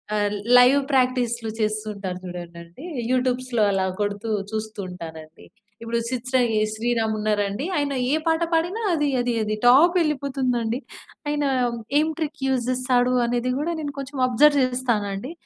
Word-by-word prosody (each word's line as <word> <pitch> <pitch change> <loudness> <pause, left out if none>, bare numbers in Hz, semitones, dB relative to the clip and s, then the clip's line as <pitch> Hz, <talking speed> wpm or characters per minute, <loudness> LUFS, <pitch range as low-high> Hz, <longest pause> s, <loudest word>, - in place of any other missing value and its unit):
ఆహ్, 205 -1 0 0.2
లైవ్ 260 +3 +6
ప్రాక్టీస్లు 245 -3 +1
చేస్తూ 215 0 -1
ఉంటారు 190 -3 -5
చూడండండి 175 - -9 0.3
యూట్యూబ్స్‌లో 255 -2 0
అలా 190 -1 +1 0.2
కొడుతూ 205 +2 -2 0.2
చూస్తూ 215 -1 -5
ఉంటానండి. 160 -2 -10 0.4
ఇప్పుడు 230 0 -2
'సిద్ 255 0 -4
శ్రీ 260 - +4 0.3
శ్రీరామ్' 225 -1 0
ఉన్నారా 210 -1 +1
అండి, 210 +9 -4
ఆయన 285 -1 0 0.2
ఏ - - +2
పాట 320 +1 +2
పాడిన 340 +5 +1 0.2
అది, 295 -3 +1
అది, 245 0 -1
అది 215 0 -1
టాప్ 300 +9 +6
వెళ్ళిపోతుందండి. 260 -6 -1 0.5
ఆయన 295 -1 0 0.5
ఏం 310 - +2
ట్రిక్ 310 -2 -3
యూజ్ 255 -2 0
జేస్తాడు 250 -1 +2
అనేది 240 +1 -1
గూడా 305 +4 -1
నేను 290 -2 -4
కొంచెం 275 0 -6
అబ్జర్వ్ 285 +4 +4
చేస్తానండి. 240 -2 -2
245 Hz, 145 wpm, -23 LUFS, 215-270 Hz, 0.5 s, లైవ్